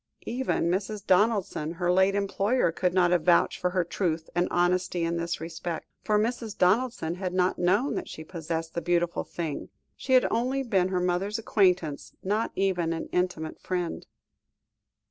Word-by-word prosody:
Even 255 +3 -1
Mrs. 200 +3 -2
Donaldson, 190 -6 +2
her 175 0 0
late 190 +2 +4
employer, 200 +1 +1
could 180 +2 0
not 175 -1 +3
have 175 -2 +3
vouched 170 +1 +3
for 180 - +1
her 180 0 +1
truth 165 -2 -2
and 175 +1 +1
honesty 180 0 +1
in 170 0 0
this 170 +1 -2
respect, 165 +1 -5 0.2
for 210 -1 +2
Mrs. 225 0 -2
Donaldson 190 -2 +2
had 185 0 -4
not 180 0 +1
known 200 +10 +2
that 360 - -4
she 160 - -8
possessed 165 -1 -4
the 170 - -2
beautiful 175 +1 0
thing; 160 -4 -5 0.3
she 260 - -2
had 255 - +6
only 260 +3 0
been 195 -7 +2
her 185 -1 0
mother's 180 +4 0
acquaintance, 180 -9 +1
not 210 +4 0
even 180 -4 +1
an 165 - -5
intimate 180 -3 -1
friend. 180 -2 -3
180 Hz, 165 wpm, -27 LUFS, 170-200 Hz, 0.3 s, had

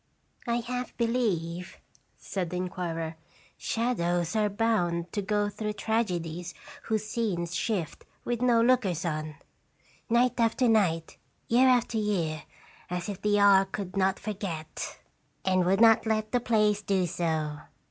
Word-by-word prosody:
" - - -43
I 235 0 +1
half 250 +1 -5
believe," 190 -7 -1 0.4
said 185 -4 -4
the 180 - -5
inquirer, 165 -3 -3 0.4
"shadows 175 -6 -1
are 210 -1 +2
bound 190 -6 0
to 205 - -1
go 205 +1 0
through 210 +1 -4
tragedies 175 -7 -2 0.3
whose 220 -1 -1
scenes 190 -7 -2
shift 190 -8 -2 0.2
with 240 -1 -2
no 240 -2 +4
lookers 210 -9 +2
on, 155 -2 -3 0.7
night 240 +2 +3
after 230 +2 +3
night, 180 -8 +1 0.3
year 250 +3 +5
after 240 -3 +3
year, 170 -8 -1 0.4
as 180 +1 -3
if 200 -2 -6
the 210 0 +2
hour 200 -1 +6
could 195 -1 -6
not 190 0 +2
forget, 180 -7 -5 0.5
and 185 -1 +3
would 190 +2 +2
not 225 0 +6
let 215 -1 0
the 245 - +2
place 210 -3 +2
do 195 -3 +1
so. 155 -3 -2
200 Hz, 140 wpm, -28 LUFS, 175-225 Hz, 0.7 s, hour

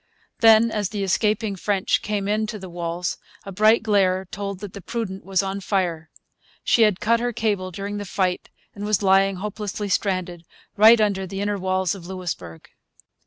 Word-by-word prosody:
Then, 225 0 +6
as 205 -3 -1
the 205 -2 -3
escaping 210 +2 0
French 195 0 0
came 205 -2 -2
in 215 +1 0
to 215 0 -5
the 190 -3 -9
walls, 170 0 -3 0.3
a 195 - -7
bright 215 +4 +4
glare 190 -3 +2
told 200 -2 -5
that 205 -2 -7
the 200 - -8
Prudent 195 -2 -5
was 195 0 0
on 195 +1 -3
fire. 175 -5 -1 0.5
She 235 - +3
had 210 -4 +4
cut 230 +2 +2
her 245 +1 -1
cable 210 -5 -1
during 200 +3 -5
the 205 - -5
fight 180 -1 -1 0.2
and 205 - -8
was 210 -1 0
lying, 195 0 +4
hopelessly 210 +1 -5
stranded, 185 -3 -1 0.3
right 220 +3 +7
under 200 -3 0
the 195 +2 -6
inner 205 0 -1
walls 185 -1 0
of 180 -4 -10
Louisbourg. 170 - -6
195 Hz, 180 wpm, -23 LUFS, 185-210 Hz, 0.5 s, right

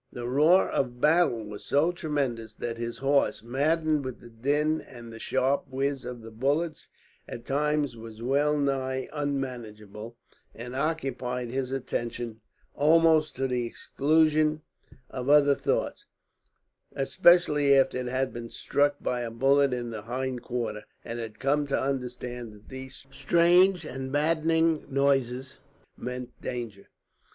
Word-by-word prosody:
The 120 -1 -5
roar 155 +9 +4
of 125 -2 -2
battle 150 -6 +3
was 105 0 -8
so 145 +10 +2
tremendous 135 - -3
that 115 0 -5
his 115 0 -4
horse, 140 -3 +1
maddened 155 +4 +1
with 130 -2 -6
the 120 - -14
din 145 +7 0
and 120 -2 -12
the 115 - -9
sharp 135 +5 0
whiz 135 +1 -2
of 120 -2 -7
the 115 - -10
bullets, 145 +8 -1 0.4
at 120 - -8
times 150 -1 0
was 110 -1 -10
well 140 +5 +1
nigh 130 -2 -1
unmanageable, 120 -6 -5 0.4
and 125 +2 -7
occupied 130 -5 -2
his 130 0 -2
attention 120 -3 -4 0.3
almost 155 0 +4
to 135 0 -1
the 125 -2 -1
exclusion 155 +3 +2 0.5
of 130 0 -4
other 145 -1 +6
thoughts; - - -2 0.9
especially 150 -2 +4
after 135 -1 +2
it 125 - -3
had 130 +1 -1
been 115 0 -7
struck 145 +4 +1
by 125 -1 -1
a 120 - -3
bullet 135 +4 +3
in 120 -1 -3
the 110 -2 -5
hind 125 +2 -3
quarters, 115 -4 -4 0.2
and 120 0 -5
had 110 -2 -6
come 145 +2 +1
to 140 - 0
understand 125 -3 -4
that 105 0 -17
those 130 0 -9
strange 175 +5 +4
and 130 -2 -5
maddening 160 +2 +2
noises 135 -2 0 0.4
meant 125 0 -6
danger. 115 -5 -6
135 Hz, 140 wpm, -27 LUFS, 120-150 Hz, 0.9 s, other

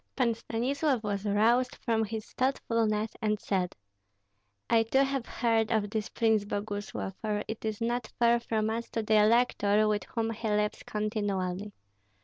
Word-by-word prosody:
Pan 245 -4 +2
Stanislav 255 +3 -1
was 205 -1 -2
roused 235 +5 +3
from 225 -3 0
his 220 0 -4
thoughtfulness 230 -4 0
and 215 -1 +1
said: 185 -4 -1 0.9
"I 230 -1 +4
too 265 +5 +3
have 270 -3 -2
heard 225 -2 +1
of 210 -2 +1
this 215 -1 -2
Prince 220 -2 +2
Boguslav, 205 -1 -4
for 210 -1 -1
it 220 - -6
is 220 -1 -2
not 240 0 -1
far 235 0 +4
from 220 -2 -1
us 230 +1 -3
to 225 - -1
the 215 0 +4
elector, 215 -2 +3
with 210 -1 0
whom 225 -1 -2
he 225 0 -4
lives 210 0 0
continually. 205 -2 -2
220 Hz, 155 wpm, -29 LUFS, 210-235 Hz, 0.9 s, I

